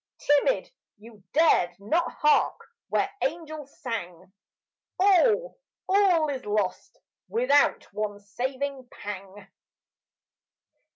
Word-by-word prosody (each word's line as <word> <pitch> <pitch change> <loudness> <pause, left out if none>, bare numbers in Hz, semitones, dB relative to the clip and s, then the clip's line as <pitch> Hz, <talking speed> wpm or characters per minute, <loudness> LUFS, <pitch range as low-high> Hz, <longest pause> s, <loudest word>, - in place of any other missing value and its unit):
Timid, 290 - +2 0.3
you 215 -1 -16
dared 195 - +3
not 320 +13 0
hark 300 0 +2 0.3
when - - +1
angels 310 -1 -4
sang. 185 - -6 0.7
All, 430 +6 +3 0.3
all 375 -5 +4
is 265 -3 -4
lost, 210 -2 -2 0.3
without 455 -11 +3
one 210 -1 -3
saving 260 +5 -4
pang. 200 -1 -8
270 Hz, 90 wpm, -26 LUFS, 205-330 Hz, 0.7 s, all